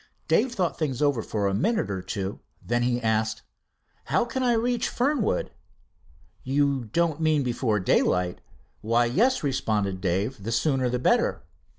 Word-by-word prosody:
Dave 245 Hz, -2 st, +2 dB
thought 180 Hz, -4 st, -1 dB
things 140 Hz, -6 st, -1 dB
over 145 Hz, -5 st, +2 dB
for 105 Hz, -2 st, -2 dB
a 100 Hz, -, +1 dB
minute 200 Hz, -, 0 dB
or 95 Hz, -2 st, -3 dB
two. 95 Hz, +1 st, -4 dB, 0.3 s
Then 120 Hz, +1 st, 0 dB
he 120 Hz, 0 st, +1 dB
asked: 110 Hz, -1 st, 0 dB, 0.6 s
"How -, -, +1 dB
can 260 Hz, +2 st, -3 dB
I 245 Hz, -2 st, +3 dB
reach 235 Hz, +1 st, 0 dB
Fernwood?" 250 Hz, -, 0 dB, 0.9 s
"You 140 Hz, -1 st, +1 dB
don't 165 Hz, +6 st, 0 dB
mean 155 Hz, -3 st, +2 dB
before 120 Hz, -3 st, 0 dB
daylight?" 90 Hz, -1 st, +1 dB, 0.4 s
"Why, 115 Hz, +2 st, +2 dB
yes," 230 Hz, -, +2 dB
responded 105 Hz, -9 st, -1 dB
Dave, 100 Hz, +6 st, -1 dB
"the 115 Hz, -, -3 dB
sooner 130 Hz, 0 st, +1 dB
the 125 Hz, -, 0 dB
better." 125 Hz, -, +1 dB
125 Hz, 155 wpm, -26 LUFS, 105-160 Hz, 0.9 s, I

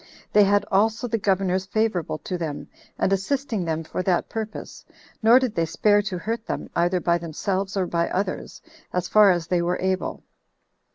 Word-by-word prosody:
They 210 Hz, -, +7 dB
had 205 Hz, +1 st, +2 dB
also 220 Hz, +5 st, +2 dB
the 225 Hz, -1 st, -1 dB
governors 190 Hz, -1 st, 0 dB
favorable 205 Hz, -7 st, 0 dB
to 185 Hz, -, -3 dB
them, 160 Hz, -4 st, -4 dB, 0.3 s
and 195 Hz, -, +1 dB
assisting 225 Hz, +1 st, -1 dB
them 160 Hz, 0 st, -2 dB
for 160 Hz, -, -4 dB
that 180 Hz, -1 st, 0 dB
purpose; 220 Hz, -1 st, -6 dB, 0.4 s
nor 230 Hz, +2 st, +7 dB
did 255 Hz, -4 st, +1 dB
they 165 Hz, -4 st, 0 dB
spare 205 Hz, +5 st, +3 dB
to 195 Hz, -3 st, -4 dB
hurt 220 Hz, +5 st, -3 dB
them, -, -, -4 dB
either 175 Hz, +2 st, +2 dB
by 170 Hz, 0 st, +1 dB
themselves 190 Hz, +4 st, -3 dB
or 190 Hz, -, +1 dB
by 170 Hz, -1 st, -1 dB
others, 190 Hz, 0 st, -3 dB, 0.3 s
as 180 Hz, 0 st, -1 dB
far 210 Hz, 0 st, +6 dB
as 175 Hz, -3 st, +1 dB
they 175 Hz, +1 st, +1 dB
were 175 Hz, +1 st, 0 dB
able. 190 Hz, 0 st, -2 dB
190 Hz, 180 wpm, -24 LUFS, 175-210 Hz, 0.4 s, They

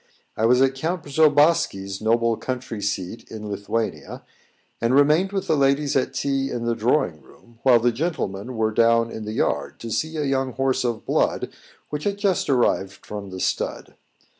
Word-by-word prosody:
I 110 Hz, -, +2 dB
was 125 Hz, +2 st, +5 dB
at 135 Hz, 0 st, +2 dB
Count 160 Hz, +5 st, -3 dB
Przobossky's 145 Hz, -, +2 dB
noble 115 Hz, +1 st, +2 dB
country 125 Hz, -3 st, -5 dB
seat 100 Hz, +1 st, -4 dB
in 105 Hz, -2 st, -7 dB
Lithuania, 100 Hz, +3 st, -3 dB, 0.6 s
and 120 Hz, +2 st, +2 dB
remained 155 Hz, +7 st, +4 dB
with 195 Hz, -1 st, -2 dB
the 160 Hz, -, +2 dB
ladies 140 Hz, +1 st, +2 dB
at 130 Hz, 0 st, 0 dB
tea 135 Hz, +1 st, 0 dB
in 120 Hz, -3 st, -3 dB
the 120 Hz, -, +1 dB
drawing 115 Hz, -, 0 dB
room, 115 Hz, -, -21 dB
while 125 Hz, -3 st, +5 dB
the 120 Hz, +1 st, +2 dB
gentlemen 120 Hz, -, -3 dB
were 110 Hz, 0 st, +1 dB
down 115 Hz, +1 st, +3 dB
in 110 Hz, -, -6 dB
the 105 Hz, -, -4 dB
yard, -, -, -1 dB
to 115 Hz, -, -6 dB
see 160 Hz, +7 st, -2 dB
a 150 Hz, -, 0 dB
young 135 Hz, -2 st, 0 dB
horse 130 Hz, 0 st, 0 dB
of 120 Hz, -3 st, -2 dB
blood -, -, 0 dB, 0.4 s
which 150 Hz, 0 st, -4 dB
had 200 Hz, -1 st, 0 dB
just 200 Hz, -6 st, 0 dB
arrived 120 Hz, -7 st, +1 dB
from 100 Hz, -2 st, -7 dB
the 95 Hz, 0 st, -7 dB
stud. -, -, -2 dB
125 Hz, 180 wpm, -23 LUFS, 110-145 Hz, 0.6 s, was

